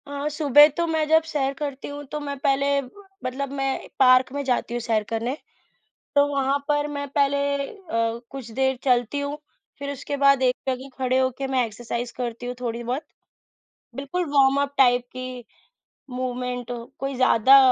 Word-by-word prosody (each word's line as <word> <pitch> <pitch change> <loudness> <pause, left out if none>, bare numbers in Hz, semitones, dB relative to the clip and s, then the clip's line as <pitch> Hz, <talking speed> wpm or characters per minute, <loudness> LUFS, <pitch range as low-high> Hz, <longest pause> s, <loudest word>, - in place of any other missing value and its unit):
अ, 285 +1 -3
सुबह 295 -1 +7
तो 340 - +1
मैं 320 -1 +1
जब 320 0 +5
सैर 275 -2 0
करती 280 -1 -5
हूँ 290 0 -7
तो 300 - -3
मैं 285 -1 -5
पहले 280 +1 +2 0.5
मतलब 265 +2 -3
मैं 270 -1 -2
पार्क 255 -1 +6
में 285 0 -2
जाती 250 -2 -1
हूँ 240 - -1
सैर 225 -2 0
करने। 230 +4 -2 0.8
तो 285 0 +5
वहाँ 275 -1 +1
पर 295 0 +2
मैं 285 0 -3
पहले 280 0 +2 0.3
अ, 230 - -3
कुछ 265 -4 -8
देर 265 +3 +1
चलती 250 +1 +2
हूँ, 285 +1 -3 0.4
फिर 280 0 -4
उसके 285 +1 -5
बाद 275 -1 +4
एक 250 -1 +3
जगह 260 +1 -2
खड़े 255 0 +1
हो 260 0 +2
के 275 - -2
मैं 260 -2 +1
एक्सरसाइज़ 235 +2 -5
करती 245 -1 -4
हूँ 245 - -3
थोड़ी-बहुत। 240 +3 -3 0.9
बिल्कुल 280 +7 -2
वार्मअप 275 +1 +3
टाइप 245 -2 +4
की 255 -1 -7 0.7
मूवमेंट 250 -1 -3 0.3
कोई 275 0 -3
ज़्यादा 255 +1 +6
270 Hz, 165 wpm, -24 LUFS, 250-280 Hz, 0.9 s, सुबह